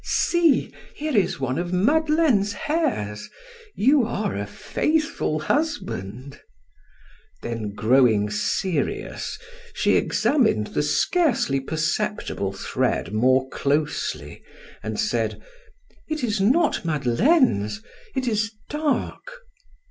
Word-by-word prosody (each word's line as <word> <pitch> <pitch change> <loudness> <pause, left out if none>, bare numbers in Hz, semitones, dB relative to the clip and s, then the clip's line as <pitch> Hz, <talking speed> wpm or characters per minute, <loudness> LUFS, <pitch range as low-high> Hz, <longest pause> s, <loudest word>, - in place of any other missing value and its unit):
"See! 335 -6 +2 0.2
Here 305 -2 -3
is 200 -8 +2
one 135 +2 -1
of 175 0 -3
Madeleine's 270 - +2
hairs; 285 - -2 0.5
you 270 +4 +4
are 215 -3 -2
a 100 0 -3
faithful 305 - -1
husband!" 140 - -3 1.0
Then 110 -3 -4
growing 110 -3 +3
serious, 150 - -2 0.4
she - - +3
examined 230 - +2
the - - +1
scarcely 230 - +1
perceptible 155 - -2
thread 95 +1 -2
more 130 +4 +3
closely 145 +3 -2 0.4
and - - -4
said: - - -1 0.7
"It 310 -3 -3
is 210 -4 0
not 295 - +2
Madeleine's, 155 - +2 0.3
it 260 -1 -1
is 220 0 0 0.2
dark." 315 - -2
200 Hz, 95 wpm, -23 LUFS, -, 1.0 s, you